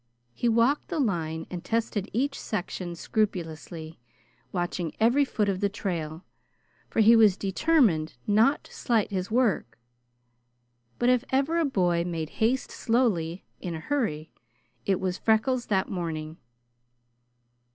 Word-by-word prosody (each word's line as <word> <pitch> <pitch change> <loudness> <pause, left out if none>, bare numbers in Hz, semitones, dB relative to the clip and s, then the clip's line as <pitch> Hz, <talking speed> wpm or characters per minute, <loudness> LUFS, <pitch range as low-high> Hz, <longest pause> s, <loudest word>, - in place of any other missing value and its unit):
He 240 - 0
walked 235 +6 +2
the 345 - -3
line 165 - -1
and 175 -2 -5
tested 225 -3 -1
each 275 +4 -1
section 180 -3 -4
scrupulously, 165 - -3 0.5
watching 175 -2 -2
every 240 +6 +4
foot 215 -6 0
of 190 -2 0
the 200 - +1
trail, 170 -5 -4 0.6
for - - +2
he 225 +2 +7
was 215 -4 +6
determined 195 - +2
not 225 +8 +3
to - - -16
slight 225 -4 0
his 185 -1 -2
work; 215 - +1 1.2
but 240 - +2
if 250 -1 +3
ever 280 +6 +1
a 330 - +2
boy 175 -10 +1
"made 165 -3 -4
haste 245 +4 +1
slowly" 200 -8 0
in 175 -2 -4
a - - -5
hurry, 160 - -2 0.6
it 190 -2 +2
was 185 -1 -2
Freckles 235 +3 +2
that 190 -2 +1
morning. 160 -3 -4
200 Hz, 135 wpm, -27 LUFS, 170-235 Hz, 1.2 s, he